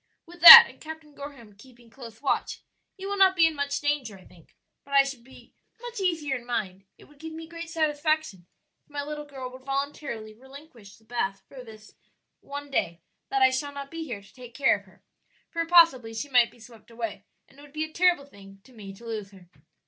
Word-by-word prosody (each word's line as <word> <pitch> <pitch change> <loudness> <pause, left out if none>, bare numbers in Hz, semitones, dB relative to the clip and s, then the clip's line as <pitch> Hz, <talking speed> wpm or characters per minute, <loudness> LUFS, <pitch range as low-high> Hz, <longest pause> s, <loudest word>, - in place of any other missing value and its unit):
With 350 0 -16
that, 470 +7 +14
and - - -17
Captain 315 -1 -11
Gorham 280 -7 -11
keeping 240 +1 -19
close 230 -1 -13
watch, 275 - -2 0.4
you 385 0 -7
will 405 0 -3
not 380 -1 +5
be 335 -2 +5
in 325 - +1
much 285 -1 -3
danger, 290 -8 -2
I 185 - -19
think; 170 -3 -21 0.3
but 280 0 -6
I 275 - +7
should 270 -3 -8
be 265 - -18 0.3
much 480 -2 -8
easier 325 -7 -1
in 240 - -13
mind 195 -5 -4
it - - -18
would 295 -1 -22
give 320 +1 -9
me 325 +1 -9
great 335 0 -9
satisfaction 310 - -2 0.4
if - - -42
my 290 -1 -5
little 300 0 -7
girl 265 -3 -9
would 255 +1 -13
voluntarily 275 -5 -5
relinquish 255 -4 -15
the 220 - -26
bath 195 -4 -4
for 260 -2 -12
this 215 -2 -15 0.5
one 285 0 -9
day 170 -9 -2 0.3
that 270 -1 +1
I 260 - +5
shall 285 +2 -3
not 280 0 -8
be 330 0 -6
here 230 -10 -7
to 195 - -21
take 245 -3 -14
care 270 +1 +3
of - - -11
her, - - -24 0.5
for 335 0 -2
possibly 270 -10 +4
she 285 +6 -5
might 245 -3 +4
be - - -22
swept 230 -1 -17
away, 225 -4 -7 0.2
and 270 - -22
it - - -14
would 290 -1 -16
be 310 +1 -3
a 315 0 -8
terrible 355 -5 +2
thing 195 -6 -17
to 260 - -20
me 200 -4 -11
to 235 - -16
lose 215 -3 -6
her." 185 -3 -19
275 Hz, 225 wpm, -26 LUFS, 225-310 Hz, 0.5 s, that